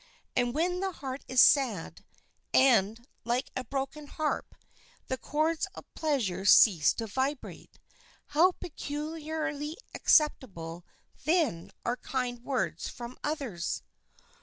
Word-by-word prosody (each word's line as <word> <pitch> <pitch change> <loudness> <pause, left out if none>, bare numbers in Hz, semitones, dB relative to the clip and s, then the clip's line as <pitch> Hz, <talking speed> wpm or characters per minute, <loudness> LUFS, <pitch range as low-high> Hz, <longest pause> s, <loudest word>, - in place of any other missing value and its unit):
And 245 0 +1
when 355 +3 +1
the 385 0 -2
heart 270 -3 -6
is 255 0 +1
sad, 240 - +3 0.5
and, 235 -3 +4 0.2
like 240 +2 -1
a 255 - -2
broken 275 +4 -4
harp, 305 +1 -3 0.5
the 260 - -2
chords 315 +4 0
of - - -9
pleasure 235 - -1
cease 195 -5 +7
to 230 - -4
vibrate, 265 +6 -4 0.5
how 335 +6 +4
peculiarly 310 0 -4 0.2
acceptable 180 - +1 0.4
then 305 - +1 0.2
are 240 +1 0
kind 245 -2 -3
words 260 -3 -2
from 240 0 -8
others! 270 - -3
270 Hz, 110 wpm, -30 LUFS, 235-305 Hz, 0.5 s, cease